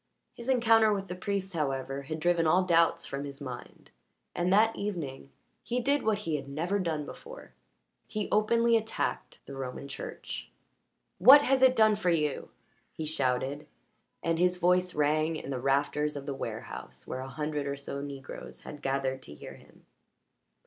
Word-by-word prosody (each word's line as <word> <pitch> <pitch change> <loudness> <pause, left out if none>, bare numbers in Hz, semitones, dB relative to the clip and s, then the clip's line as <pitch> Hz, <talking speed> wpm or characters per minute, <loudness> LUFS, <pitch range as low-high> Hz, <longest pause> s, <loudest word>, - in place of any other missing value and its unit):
His 235 +2 -7
encounter 225 -3 +5
with 195 -2 -2
the 180 - -4
priest, 195 +1 -3
however, 135 -3 -2
had 155 +3 -5
driven 170 0 +2
all 180 +4 +4
doubts 170 -2 +3
from 140 0 -4
his 140 -1 -8
mind, 130 -4 -9 0.4
and 175 +1 0
that 220 +3 +4
evening 160 -10 -4 0.3
he 245 +1 -2
did 280 +4 +2
what 220 -1 +1
he 165 -7 -2
had 140 -1 -8
never 170 +8 -1
done 160 -5 -2
before - - -11 0.5
he 210 -2 -3
openly 230 +2 +3
attacked 220 0 -2
the 140 - -9
Roman 135 +1 -5
Church. 140 - -7 0.7
"What 285 +3 +9
has 265 -1 +2
it 260 -1 +6
done 215 -2 +5
for 205 -4 0
you?" 150 -4 0 0.4
he 160 - -5
shouted, 140 0 -1 0.6
and 165 -1 0
his 180 0 +3
voice 180 0 +2
rang 155 +2 +2
in 140 - -6
the 130 - -2
rafters 145 +2 +1
of 140 -1 -6
the 140 - -3
warehouse 135 - -7
where - - -5
a 130 - -5
hundred 150 +1 -3
or 140 0 -3
so 140 0 -5
Negroes 140 -2 -8
had 145 - -9
gathered 135 -1 -1
to 75 - -11
hear - - -10
him. - - -19
160 Hz, 170 wpm, -29 LUFS, 140-205 Hz, 0.7 s, What